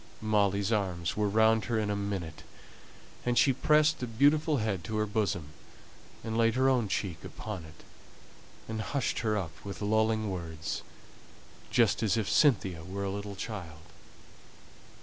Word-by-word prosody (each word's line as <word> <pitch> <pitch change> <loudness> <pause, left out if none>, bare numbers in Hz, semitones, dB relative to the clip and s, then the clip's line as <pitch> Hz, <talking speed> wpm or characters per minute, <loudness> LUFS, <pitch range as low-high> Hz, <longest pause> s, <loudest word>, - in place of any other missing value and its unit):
Molly's 100 -1 +1
arms 90 -6 -1
were 105 -1 +1
round 110 +1 +4
her 115 -2 0
in 105 -1 0
a - - 0
minute, 100 -5 -4 0.8
and 120 -1 0
she 135 - +5
pressed 150 +4 +3
the 125 - -3
beautiful 145 +6 +3
head 105 -6 -1
to 110 - -3
her 105 - +1
bosom, 100 -8 -1 0.7
and 110 0 -3
laid 115 0 +3
her 130 +1 +3
own 125 -5 +2
cheek 95 -4 -3
upon 100 -7 -7
it, 80 0 -15 0.8
and 110 -1 -3
hushed 135 +4 -1
her 110 -2 0
up 90 -6 -3
with 100 -1 -6
lulling 110 0 +1
words, 80 -3 -4 0.9
just - - +3
as 110 0 +2
if 110 -3 -1
Cynthia 95 - +3
were 95 +3 -5
a 100 - -2
little 100 0 -5
child. 85 -6 -7
105 Hz, 155 wpm, -30 LUFS, 95-115 Hz, 0.9 s, she